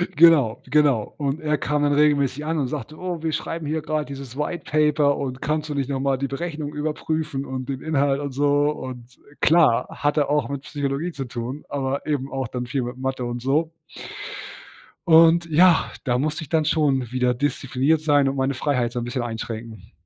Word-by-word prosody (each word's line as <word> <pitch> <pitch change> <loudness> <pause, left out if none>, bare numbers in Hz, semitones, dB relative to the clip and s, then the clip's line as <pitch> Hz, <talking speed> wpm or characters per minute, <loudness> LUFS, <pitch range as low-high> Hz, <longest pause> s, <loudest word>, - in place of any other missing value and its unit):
Genau, 140 -7 +5
genau 140 -7 +2
und 145 0 -1
er 150 -1 +1
kam 150 +2 -1
dann 145 0 +2
regelmäßig 145 -1 +2
an 160 0 -1
und 135 - 0
sagte: 150 +2 -6
„Oh, 180 -3 -4
wir 160 - 0
schreiben 165 +1 -4
hier 155 +2 -1
grad 155 -1 -2
dieses 135 -2 -8
Whitepaper 150 -1 +1
und 130 -1 -4
kannst 155 +1 -1
du - - -2
nicht 140 -1 -1
noch 135 -1 -1
mal 135 0 +1
die 140 +1 -2
Berechnung 150 +1 -4
überprüfen 150 -1 -2
und 130 -1 -5
den 135 -1 -4
Inhalt 140 -3 +1
und 145 -1 -4
so“ 145 +2 +2
und 125 -4 -7 0.2
klar, 160 -8 +4
hatte 145 0 0
auch 145 -5 +1
mit 140 -1 -4
Psychologie 145 +3 -3
zu 140 -4 -5
tun, 120 +4 -6
aber 140 -1 -2
eben 140 -3 -2
auch 135 -2 -2
dann 125 +1 -5
viel 135 0 -1
mit 120 +1 -6
Mathe 130 -1 -3
und 120 0 -4
so. 150 +6 +1 1.4
Und 165 +1 +6
ja, 170 +2 +5
da 120 -2 +1
musste 155 +4 -1
ich 145 - -12
dann 160 -2 +2
schon 140 -6 +1
wieder 125 -1 +1
diszipliniert 135 +3 0
sein 145 -3 +3
und 135 - -3
meine 135 +1 +1
Freiheit 125 -3 0
so 125 - -2
'n - - -3
bisschen 125 +1 -3
einschränken. 115 -3 -6
140 Hz, 195 wpm, -23 LUFS, 130-150 Hz, 1.4 s, Und